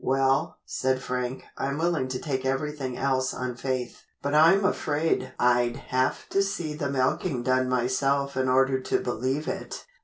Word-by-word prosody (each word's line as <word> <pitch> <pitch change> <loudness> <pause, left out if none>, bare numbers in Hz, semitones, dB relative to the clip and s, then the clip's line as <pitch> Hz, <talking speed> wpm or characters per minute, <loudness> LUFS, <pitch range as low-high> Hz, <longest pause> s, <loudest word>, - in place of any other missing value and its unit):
"Well," 135 +1 +1
said 130 0 0
Frank, 125 0 -3 0.2
"I'm 140 +1 -1
willing 165 -5 +1
to 130 0 -3
take 130 -2 -3
everything 135 -1 -2
else 130 -1 0
on 125 0 -3
faith, 125 0 -3 0.2
but 140 +1 -1
I'm 170 +6 +6
afraid 150 -6 0
I'd 120 -1 +3
have 130 -1 -1
to 195 - +2
see 195 -6 -2
the 150 -2 -3
milking 130 +1 0
done 130 0 +2
myself 135 +3 +1
in 130 0 +1
order 135 +1 +3
to 130 - 0
believe 130 +6 -2
it." - - -5
130 Hz, 160 wpm, -26 LUFS, 130-145 Hz, 0.2 s, I'm